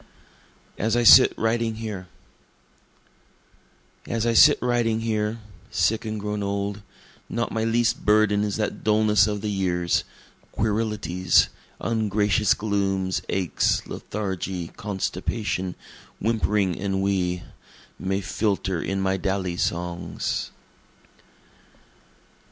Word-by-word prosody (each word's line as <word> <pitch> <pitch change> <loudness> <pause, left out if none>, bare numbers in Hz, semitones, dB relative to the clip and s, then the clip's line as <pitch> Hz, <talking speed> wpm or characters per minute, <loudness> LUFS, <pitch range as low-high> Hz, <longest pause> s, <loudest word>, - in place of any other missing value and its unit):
As 110 +2 +1
I 120 - +2
Sit 125 +3 +9
Writing 115 0 0
Here 105 -5 -6 2.0
As 115 -1 -1
I 115 - +2
sit - - +7
writing 120 -2 +1
here, 110 0 -1 0.3
sick 110 +1 +1
and 110 -1 -3
grown 105 0 -3
old, 100 0 -2 0.5
Not 115 0 -2
my 110 - -1
least 115 +1 +1
burden 105 -1 +3
is 105 0 -2
that 105 -2 -3
dulness 105 0 +4
of 105 -1 -2
the 105 0 -2
years, 90 -3 0 0.5
querilities, 105 -5 +1 0.3
Ungracious 105 -1 +1
glooms, 95 -3 -1
aches, 95 -3 0
lethargy, 95 -4 -4
constipation, 95 -1 -3 0.4
whimpering 105 -3 +1
ennui, 95 -2 -1 0.6
May 95 +1 -1
filter 95 -3 -1
in 95 0 -2
my 95 0 +1
dally 95 -2 -2
songs. 85 -1 -2
105 Hz, 100 wpm, -24 LUFS, 95-110 Hz, 2.0 s, Sit